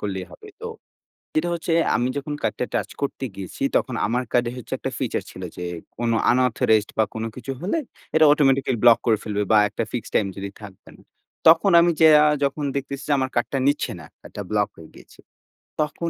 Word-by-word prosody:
করলেই 95 Hz, -2 st, -4 dB
হবে। 425 Hz, -, -13 dB
তো 465 Hz, -, -4 dB, 0.7 s
যেটা 155 Hz, +3 st, +1 dB
হচ্ছে 170 Hz, 0 st, -3 dB, 0.2 s
আমি 125 Hz, +1 st, 0 dB
যখন 145 Hz, +1 st, -3 dB
কার্ডটা 125 Hz, -, -1 dB
টাচ -, -, -1 dB
করতে 140 Hz, -1 st, -2 dB
গিয়েছি 95 Hz, +5 st, -7 dB
তখন 130 Hz, -, 0 dB
আমার 120 Hz, +4 st, 0 dB
কার্ডে 120 Hz, -1 st, +2 dB
হচ্ছে 125 Hz, -, -10 dB
একটা -, -, -4 dB
ফিচার -, -, -2 dB
ছিল, -, -, -10 dB
যে 90 Hz, -, -5 dB, 0.3 s
কোন 120 Hz, -1 st, -1 dB, 0.2 s
আনঅথরাইজড 115 Hz, -3 st, +2 dB
বা 110 Hz, -, +5 dB
কোন 110 Hz, 0 st, -3 dB
কিছু 130 Hz, +1 st, -5 dB
হলে 200 Hz, -, -1 dB, 0.4 s
এটা 160 Hz, 0 st, +6 dB
অটোমেটিক্যালি 135 Hz, -4 st, +2 dB
ব্লক 120 Hz, -1 st, +8 dB
করে 110 Hz, -3 st, +3 dB
ফেলবে, 105 Hz, -1 st, -2 dB
বা 110 Hz, -, +7 dB
একটা 105 Hz, +3 st, -3 dB
ফিক্সড 120 Hz, -, -5 dB
টাইম 105 Hz, -, +3 dB
যদি 100 Hz, 0 st, -5 dB
থাকবে 100 Hz, -3 st, -13 dB
না। -, -, -20 dB, 0.5 s
তখন 165 Hz, +4 st, +6 dB
আমি 170 Hz, +1 st, +4 dB
যাইয়া 155 Hz, -2 st, +7 dB, 0.2 s
যখন 140 Hz, +2 st, -1 dB
দেখতেছি, 140 Hz, 0 st, -4 dB
যে -, -, +2 dB
আমার 130 Hz, -1 st, -1 dB
কার্ডটা 120 Hz, +3 st, 0 dB
নিচ্ছে 145 Hz, +1 st, +1 dB
না, 75 Hz, -, -11 dB
কার্ডটা 100 Hz, -, -8 dB
ব্লক 105 Hz, -1 st, +1 dB
হয়ে 80 Hz, -1 st, -13 dB
গিয়েছে। -, -, -17 dB, 0.6 s
তখন 160 Hz, +3 st, -4 dB
125 Hz, 195 wpm, -23 LUFS, 110-150 Hz, 0.7 s, ব্লক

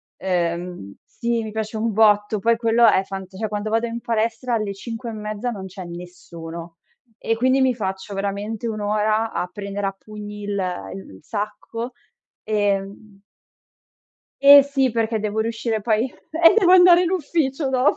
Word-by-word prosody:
ehm, 175 Hz, -, -3 dB
sì, 235 Hz, -1 st, -2 dB
mi 215 Hz, -, -6 dB
piace 220 Hz, 0 st, -4 dB
un 225 Hz, +1 st, 0 dB
botto, 210 Hz, 0 st, +3 dB
poi 230 Hz, +2 st, +3 dB
quello 230 Hz, 0 st, +4 dB
è 190 Hz, -, +4 dB
fant 190 Hz, -1 st, -8 dB
cioè 220 Hz, 0 st, -3 dB
quando 210 Hz, +1 st, -3 dB
vado 225 Hz, +2 st, +1 dB
in 235 Hz, 0 st, -4 dB
palestra 230 Hz, +1 st, -1 dB
alle 215 Hz, -3 st, -1 dB
5 230 Hz, +4 st, -7 dB
e -, -, -6 dB
mezza 215 Hz, +2 st, -4 dB
non 195 Hz, -4 st, -7 dB
c'è 190 Hz, 0 st, -8 dB
nessuno. 170 Hz, -1 st, -9 dB, 0.4 s
E 225 Hz, -, -1 dB
quindi 255 Hz, +3 st, +2 dB
mi 260 Hz, -1 st, +3 dB
faccio 190 Hz, -2 st, -4 dB
veramente 200 Hz, +3 st, -3 dB
1 215 Hz, -1 st, -3 dB
ora 215 Hz, +2 st, 0 dB
a 180 Hz, -, -2 dB
prendere 200 Hz, +1 st, -4 dB
a 195 Hz, -, -4 dB
pugni 210 Hz, 0 st, -9 dB
il 205 Hz, -, -5 dB, 0.4 s
il 195 Hz, -, -9 dB
il 95 Hz, -, -15 dB
sacco. 230 Hz, +3 st, -5 dB, 0.5 s
Ehm 200 Hz, -1 st, -2 dB, 1.2 s
E 280 Hz, 0 st, +10 dB
sì, 270 Hz, -2 st, +1 dB
perché 225 Hz, -1 st, 0 dB
devo 210 Hz, +1 st, -1 dB
riuscire 225 Hz, 0 st, -2 dB
poi 220 Hz, +1 st, +1 dB
eh 330 Hz, +5 st, +3 dB
devo 365 Hz, -4 st, +4 dB
andare 355 Hz, -1 st, +7 dB
in 350 Hz, -, 0 dB
ufficio 300 Hz, -5 st, -1 dB
dopo. 260 Hz, +1 st, +2 dB
215 Hz, 165 wpm, -22 LUFS, 200-235 Hz, 1.2 s, E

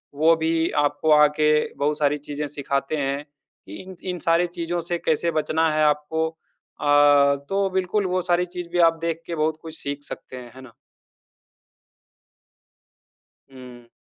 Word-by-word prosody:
वो 160 Hz, +3 st, +4 dB
भी 160 Hz, 0 st, 0 dB, 0.2 s
आपको 155 Hz, +2 st, 0 dB
आके 150 Hz, 0 st, +4 dB, 0.3 s
बहुत 145 Hz, +1 st, 0 dB
सारी 145 Hz, 0 st, +2 dB
चीज़ें 145 Hz, +1 st, -5 dB
सिखाते 140 Hz, +1 st, -2 dB
हैं 140 Hz, 0 st, -2 dB
कि 145 Hz, -8 st, -17 dB
इन 185 Hz, 0 st, -11 dB, 0.2 s
इन 180 Hz, -, -6 dB
सारी 165 Hz, +2 st, +2 dB
चीज़ों 175 Hz, +1 st, -2 dB
से 175 Hz, +1 st, -3 dB
कैसे 165 Hz, +2 st, 0 dB
बचना 160 Hz, +1 st, +1 dB
है 155 Hz, -, +2 dB
आपको। 150 Hz, +2 st, 0 dB
अ, 145 Hz, -3 st, +2 dB
तो 195 Hz, 0 st, 0 dB
बिल्कुल 190 Hz, +2 st, 0 dB
वो 185 Hz, 0 st, 0 dB
सारी 175 Hz, +1 st, +2 dB
चीज़ 175 Hz, -1 st, -7 dB
भी 175 Hz, -, +1 dB
आप 165 Hz, -, -14 dB
देख 165 Hz, 0 st, -2 dB
के 170 Hz, -, -4 dB
बहुत 155 Hz, 0 st, 0 dB
कुछ 160 Hz, 0 st, -7 dB
सीख 145 Hz, 0 st, -5 dB
सकते 130 Hz, -, -8 dB
हैं। 120 Hz, -2 st, -10 dB
है 130 Hz, -, -11 dB
ना? 130 Hz, -3 st, -14 dB, 2.8 s
हुँ। 125 Hz, -2 st, -13 dB
155 Hz, 160 wpm, -23 LUFS, 145-165 Hz, 2.8 s, वो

